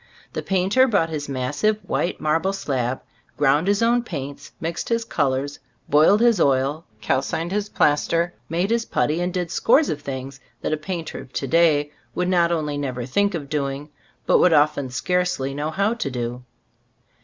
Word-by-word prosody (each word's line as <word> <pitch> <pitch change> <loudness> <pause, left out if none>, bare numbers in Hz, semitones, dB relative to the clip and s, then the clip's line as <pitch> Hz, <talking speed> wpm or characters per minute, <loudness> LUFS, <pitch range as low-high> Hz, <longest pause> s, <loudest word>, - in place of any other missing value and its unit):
The - - -3
painter 195 +8 +3
brought 180 -9 +1
his 145 -2 -4
massive 145 +11 0
white 175 - -1
marble 165 +5 +1
slab, 130 -9 -2 0.4
ground 145 +4 +3
his 205 +2 +2
own 240 +1 +3
paints, 140 - -7
mixed 165 +1 -4
his 230 -1 0
colors, 140 -5 -1 0.3
boiled 155 +9 +5
his 235 -5 +4
oil, 140 +3 +1 0.2
cal 130 -1 +1
cined 165 +5 -3
his 205 +1 -1
plaster, 165 +3 +1 0.2
made 175 +5 0
his 230 0 +2
putty 160 -5 0
and 180 +1 -1
did 175 -2 -3
scores 290 +6 +3
of 145 - -3
things 135 -1 -6 0.2
that - - -1
a - - +1
painter 165 +1 -5
of 130 - -12
to - - -2
day 150 -1 +3 0.2
would 180 0 0
not 175 -2 +3
only 150 -3 -1
never 125 -4 -3
think 200 +9 +1
of 145 -4 -5
doing, 140 0 -3 0.4
but - - +4
would 180 - +5
often 145 -3 +3
scarcely 180 -1 -1
know 145 +2 -2
how 200 +7 +1
to 235 -12 -3
do. 125 -1 -4
155 Hz, 180 wpm, -23 LUFS, 140-185 Hz, 0.4 s, boiled